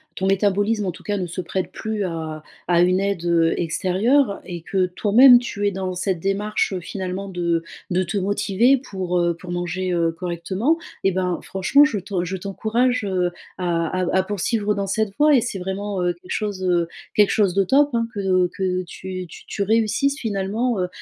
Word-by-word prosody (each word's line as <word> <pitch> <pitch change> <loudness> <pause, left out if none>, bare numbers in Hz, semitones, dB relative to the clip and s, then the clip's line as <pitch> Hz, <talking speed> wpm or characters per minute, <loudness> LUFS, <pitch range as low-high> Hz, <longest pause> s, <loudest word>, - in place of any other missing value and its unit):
ton 190 - -1
métabolisme, 205 +2 +1
en 185 - -1
tout - - -14
cas, 205 -1 -1
ne 180 -2 -2
se 175 +2 -4
prête 185 +1 -3
plus 220 -2 -3
à 160 -3 -5 0.3
à 175 -1 +4
une 185 +2 +3
aide, 195 -4 -1
heu, 165 -1 +3
extérieure 200 - +1
et 175 -2 -6
que 185 +2 0
toi-même 230 +7 +6
tu 205 -4 -2
es - - +1
dans 190 -1 -3
cette 180 0 -1
démarche 195 0 0
finalement 185 +2 -5
de 170 -3 -1 0.3
de 185 +1 +2
te 185 +3 -3
motiver 205 +6 +2
pour, 185 -8 -3
heu, 170 -1 +1
pour 175 +1 -9
manger, 175 +1 -2
heu, 165 -1 +1
correctement 185 - -1 0.3
et 195 - +3
ben, 180 -1 -1
franchement, 195 +10 +3
je 260 -9 +1
t'en 185 -1 -3
je 185 +2 -3
t'encourage, 220 +6 0
heu, 185 -3 0 0.3
à 170 -2 0 0.2
à 180 - -1
à 190 - +3
poursuivre 210 +2 -1
dans 200 -1 -2
cette 215 +1 0
voie 300 0 +6
et 250 - +4
c'est 220 -4 -3
vraiment, 190 +1 -3
heu, 175 0 +1
quelque 175 +2 -14
chose, 205 -3 -2
heu, 175 -2 +2 0.3
quelque 210 -1 +4
chose 200 -4 +2
de 195 +1 +2
top, 285 +8 +4
hein, 230 -1 +1
que 185 -2 +2
que 185 -1 -1
tu 185 +1 -7
tu - - -13
tu 200 - -2
réussisses 225 +7 +1
finalement, 215 +1 -1
heu, 180 - 0
190 Hz, 195 wpm, -22 LUFS, 180-210 Hz, 0.3 s, toi-même